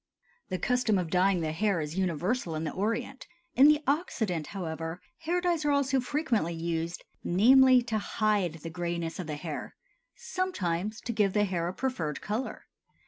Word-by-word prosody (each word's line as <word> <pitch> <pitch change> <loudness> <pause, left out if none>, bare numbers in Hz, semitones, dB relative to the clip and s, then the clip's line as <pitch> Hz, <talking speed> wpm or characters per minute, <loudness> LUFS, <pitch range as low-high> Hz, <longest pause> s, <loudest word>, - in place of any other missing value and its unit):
The 185 - -1
custom 250 -1 +1
of 175 -3 -2
dyeing 185 0 +3
the 155 -1 -1
hair 195 +2 +1
is 155 +1 -4
universal 180 - -1
in 155 - -2
the 155 - -2
Orient; 225 +6 -3 0.3
in 270 +3 +7
the 300 0 +4
Occident, 220 - -1
however, 165 -2 -5 0.2
hair 335 +2 0
dyes 350 -3 0
are 295 - +1
also 280 -1 +2
frequently 245 - 0
used, 165 +1 -3 0.2
namely, 255 +6 +6
to 220 -2 -1
hide 205 -5 0
the 165 - -5
grayness 170 -1 -3
of 180 - -4
the 150 - -3
hair, 155 0 -6 0.4
sometimes 215 - -2
to 235 - -3
give 205 -3 +2
the 210 -1 +3
hair 175 -3 -1
a 180 - -3
preferred 170 - -2
color. 220 +6 -4
195 Hz, 170 wpm, -29 LUFS, 170-255 Hz, 0.4 s, in